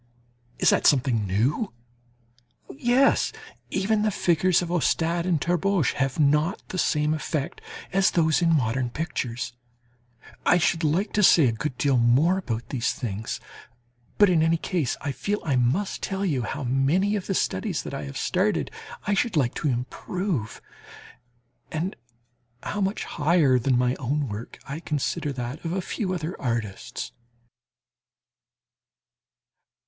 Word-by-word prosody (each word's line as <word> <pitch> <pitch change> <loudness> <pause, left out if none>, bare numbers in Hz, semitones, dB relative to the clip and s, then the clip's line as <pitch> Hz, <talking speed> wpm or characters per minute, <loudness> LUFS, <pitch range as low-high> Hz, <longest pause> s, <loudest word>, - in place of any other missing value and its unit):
Is - - +4
that - - +3
something 125 -7 +2
new? 125 - 0 1.0
Yes, 245 - +3 0.4
even 210 +3 +1
the 215 - +2
figures 180 -2 +2
of 170 - -5
Ostade 170 +2 +1
and 170 -4 +2
Terborch 175 -1 +1
have 135 +1 -1
not 150 +6 +3
the 185 - -3
same 150 -1 +2
effect 155 -2 -3 0.3
as 195 0 +4
those 160 -2 +2
in 170 -1 +3
modern 125 -4 +1
pictures. 125 -4 -3 0.9
I 175 - +5
should 170 0 +1
like 170 +7 +1
to 210 - +2
say 170 -6 +7
a 120 - +3
good 125 +4 -4
deal 140 -3 +2
more 135 +11 +4
about 120 -9 -4
these 120 -3 0
things, 110 -2 -4 0.8
but 205 - +7
in 175 -4 +3
any 165 +1 +3
case 165 -6 -1
I 145 - -2
feel 205 +9 -2
I 140 -5 +1
must 130 +12 0
tell 195 +1 -2
you 145 -9 0
how 140 +5 -4
many 140 +11 +2
of 200 - -4
the 195 - 0
studies 95 - -1
that - - -7
I 75 - -4
have 70 - -7
started - - 0 0.3
I 205 - +1
should 205 -2 +1
like 125 -4 +2
to - - -2
improve, 130 - -3 1.1
and 170 +5 -2 0.7
how 205 - -3
much 195 +2 -1
higher 150 -5 +3
than 125 +1 +2
my 125 0 +2
own 140 +2 -1
work 105 +3 -7
I 140 +3 -5
consider 150 -2 -2
that 125 +3 -5
of 165 0 -2
a 190 - 0
few 185 +1 -3
other 175 -1 -3
artists. 115 -6 -3
155 Hz, 150 wpm, -25 LUFS, 125-180 Hz, 1.1 s, say